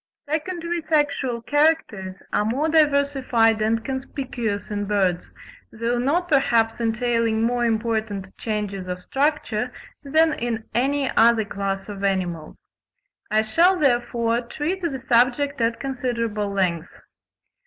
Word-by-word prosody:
Secondary 335 Hz, +2 st, -2 dB
sexual 290 Hz, -6 st, 0 dB
characters 290 Hz, -11 st, 0 dB
are -, -, +2 dB
more 255 Hz, +9 st, 0 dB
diversified 280 Hz, -7 st, +3 dB
and 225 Hz, +1 st, 0 dB
conspicuous 250 Hz, -6 st, -4 dB
in 205 Hz, 0 st, -2 dB
birds, 190 Hz, -4 st, 0 dB, 0.4 s
though 235 Hz, +2 st, -1 dB
not 320 Hz, +8 st, +1 dB
perhaps 240 Hz, -7 st, +2 dB
entailing 230 Hz, -1 st, +1 dB
more 240 Hz, +1 st, +1 dB
important 220 Hz, -4 st, -2 dB
changes 205 Hz, -4 st, -4 dB
of 180 Hz, 0 st, -5 dB
structure, 270 Hz, -5 st, -1 dB, 0.3 s
than 315 Hz, +2 st, +3 dB
in 235 Hz, -6 st, -3 dB
any 270 Hz, +3 st, +1 dB
other 225 Hz, -1 st, +5 dB
class 195 Hz, -1 st, -3 dB
of 200 Hz, -1 st, -7 dB
animals. 180 Hz, -5 st, -2 dB, 0.6 s
I 215 Hz, +1 st, +3 dB
shall, 340 Hz, +12 st, +3 dB
therefore, 240 Hz, -4 st, +1 dB
treat 310 Hz, +10 st, -3 dB
the 305 Hz, -7 st, -2 dB
subject 255 Hz, +2 st, +2 dB
at 230 Hz, 0 st, +1 dB
considerable 230 Hz, -6 st, -2 dB
length. 180 Hz, -4 st, -1 dB
235 Hz, 120 wpm, -23 LUFS, 215-280 Hz, 0.6 s, other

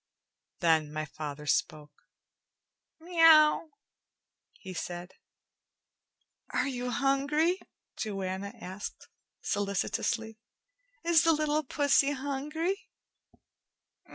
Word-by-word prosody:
Then 160 Hz, -3 st, +3 dB
my 155 Hz, 0 st, -3 dB
father 150 Hz, 0 st, -7 dB
spoke. 150 Hz, -1 st, -2 dB, 0.9 s
"Meow," 325 Hz, -2 st, +5 dB, 0.8 s
he 190 Hz, -2 st, -10 dB
said. 175 Hz, 0 st, -5 dB, 1.4 s
"Are 250 Hz, -, 0 dB
you 250 Hz, -2 st, -3 dB
hungry?" 285 Hz, +7 st, +1 dB, 0.4 s
Joanna 195 Hz, -2 st, -3 dB
asked 190 Hz, 0 st, -8 dB, 0.3 s
solicitously. 215 Hz, +2 st, -1 dB, 0.6 s
"Is 335 Hz, -1 st, +4 dB
the 330 Hz, -1 st, +5 dB
little 305 Hz, 0 st, +1 dB
pussy 285 Hz, 0 st, +2 dB
hungry?" 295 Hz, +7 st, -3 dB
250 Hz, 75 wpm, -30 LUFS, 185-305 Hz, 1.4 s, Meow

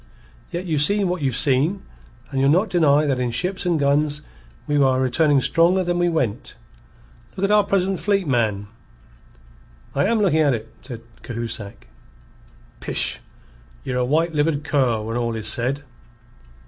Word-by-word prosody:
"Yet 175 Hz, +2 st, -5 dB
you've 155 Hz, -5 st, -1 dB
seen 200 Hz, +5 st, +2 dB
what 180 Hz, -2 st, -3 dB
you've 130 Hz, -3 st, 0 dB
seen, 145 Hz, +8 st, +2 dB, 0.5 s
and 135 Hz, -1 st, -1 dB
you'll 135 Hz, -, +3 dB
not 185 Hz, +8 st, +2 dB
deny 150 Hz, -4 st, +3 dB
that 135 Hz, -3 st, -1 dB
in 125 Hz, -1 st, -1 dB
ships 180 Hz, +10 st, -2 dB
and 170 Hz, -3 st, +1 dB
guns 145 Hz, +1 st, +1 dB, 0.4 s
we 145 Hz, -, -1 dB
are 130 Hz, -2 st, +3 dB
returning 140 Hz, +3 st, +2 dB
stronger 175 Hz, +6 st, +2 dB
than 175 Hz, 0 st, -1 dB
we 175 Hz, 0 st, +2 dB
went. 130 Hz, -7 st, -3 dB, 0.8 s
Look 190 Hz, -, -4 dB
at 200 Hz, -, +1 dB
our 210 Hz, 0 st, +5 dB
present 195 Hz, -1 st, -1 dB
fleet, 200 Hz, -2 st, 0 dB
man." 110 Hz, -6 st, 0 dB, 1.3 s
"I 140 Hz, -, +1 dB
am 225 Hz, +2 st, +1 dB
looking 180 Hz, -7 st, +2 dB
at 145 Hz, -5 st, +3 dB
it," 110 Hz, 0 st, -9 dB
said 120 Hz, -4 st, -9 dB, 0.2 s
Cahusac. 115 Hz, -4 st, -6 dB, 0.9 s
"Pish! -, -, +3 dB, 0.6 s
Ye're 125 Hz, -, -3 dB
a -, -, +1 dB
white 160 Hz, +6 st, 0 dB
livered 150 Hz, -1 st, 0 dB
cur 130 Hz, -7 st, 0 dB
when 115 Hz, +2 st, -4 dB
all 115 Hz, -1 st, -2 dB
is 110 Hz, -1 st, -4 dB
said." 130 Hz, +5 st, 0 dB
145 Hz, 160 wpm, -21 LUFS, 125-175 Hz, 1.3 s, our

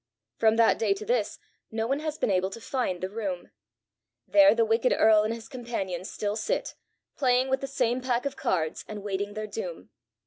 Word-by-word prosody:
"From 220 Hz, -1 st, +4 dB
that 230 Hz, 0 st, +4 dB
day 310 Hz, -, +2 dB
to 425 Hz, +2 st, -7 dB
this 485 Hz, +3 st, 0 dB, 0.3 s
no 220 Hz, 0 st, -2 dB
one 275 Hz, +4 st, 0 dB
has 310 Hz, 0 st, -3 dB
been -, -, 0 dB
able 185 Hz, 0 st, +1 dB
to 215 Hz, -, -8 dB
find 230 Hz, -7 st, -2 dB
the 185 Hz, -, -2 dB
room. 200 Hz, -5 st, -4 dB, 0.8 s
There 200 Hz, +2 st, +6 dB
the 230 Hz, -1 st, +3 dB
wicked 225 Hz, +3 st, +2 dB
earl 215 Hz, -1 st, +6 dB
and 215 Hz, +1 st, -1 dB
his 230 Hz, -1 st, -6 dB
companions 200 Hz, -8 st, -4 dB
still 205 Hz, 0 st, -2 dB
sit, 220 Hz, -, -2 dB, 0.4 s
playing 255 Hz, -1 st, +2 dB
with 265 Hz, 0 st, +1 dB
the 275 Hz, -, -3 dB
same 255 Hz, -2 st, 0 dB
pack 250 Hz, 0 st, 0 dB
of 280 Hz, -, -2 dB
cards, 160 Hz, -3 st, -1 dB
and 210 Hz, -2 st, -7 dB
waiting 205 Hz, 0 st, -3 dB
their 215 Hz, 0 st, -3 dB
doom. 485 Hz, -, -6 dB
225 Hz, 200 wpm, -27 LUFS, 205-255 Hz, 0.8 s, There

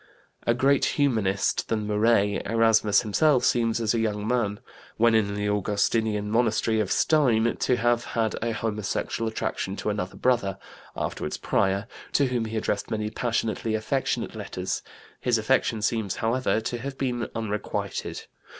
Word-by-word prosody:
" -, -, -31 dB
A -, -, +1 dB
greater 135 Hz, +2 st, +3 dB
Humanist 110 Hz, -9 st, +1 dB
than 110 Hz, -2 st, -1 dB
Muret, 105 Hz, -1 st, +2 dB
Erasmus 110 Hz, -2 st, +4 dB
himself, 130 Hz, +5 st, +3 dB
seems 115 Hz, -1 st, +2 dB
as 110 Hz, -1 st, +1 dB
a 115 Hz, -, +1 dB
young 105 Hz, -2 st, -1 dB
man, 110 Hz, -4 st, 0 dB, 0.4 s
when 115 Hz, +1 st, +4 dB
in 100 Hz, -2 st, +2 dB
the 105 Hz, 0 st, -1 dB
Augustinian 105 Hz, +1 st, 0 dB
monastery 110 Hz, -1 st, +2 dB
of 100 Hz, -3 st, -1 dB
Stein, 120 Hz, -7 st, +3 dB
to 125 Hz, -, +2 dB
have 120 Hz, 0 st, +2 dB
had 110 Hz, -2 st, -1 dB
a 115 Hz, -, 0 dB
homosexual 110 Hz, 0 st, -2 dB
attraction 100 Hz, -3 st, -3 dB
to 105 Hz, -, -2 dB
another 95 Hz, -3 st, -4 dB
Brother 120 Hz, -7 st, +1 dB, 0.4 s
(afterward -, -, -3 dB
Prior) 100 Hz, +1 st, +1 dB, 0.3 s
to 140 Hz, -, +4 dB
whom 125 Hz, -3 st, -1 dB
he 110 Hz, 0 st, -4 dB
addressed -, -, -2 dB
many 105 Hz, -1 st, -2 dB
passionately 115 Hz, -1 st, -1 dB
affectionate 120 Hz, +1 st, -1 dB
letters; 100 Hz, -4 st, -4 dB, 0.4 s
his 120 Hz, -2 st, +2 dB
affection 110 Hz, -1 st, +1 dB
seems, 110 Hz, -4 st, 0 dB
however, 115 Hz, 0 st, +1 dB
to 120 Hz, +2 st, -3 dB
have 135 Hz, +2 st, -6 dB
been 125 Hz, -3 st, -2 dB
unrequited. 105 Hz, -2 st, -3 dB
110 Hz, 150 wpm, -26 LUFS, 105-120 Hz, 0.4 s, Erasmus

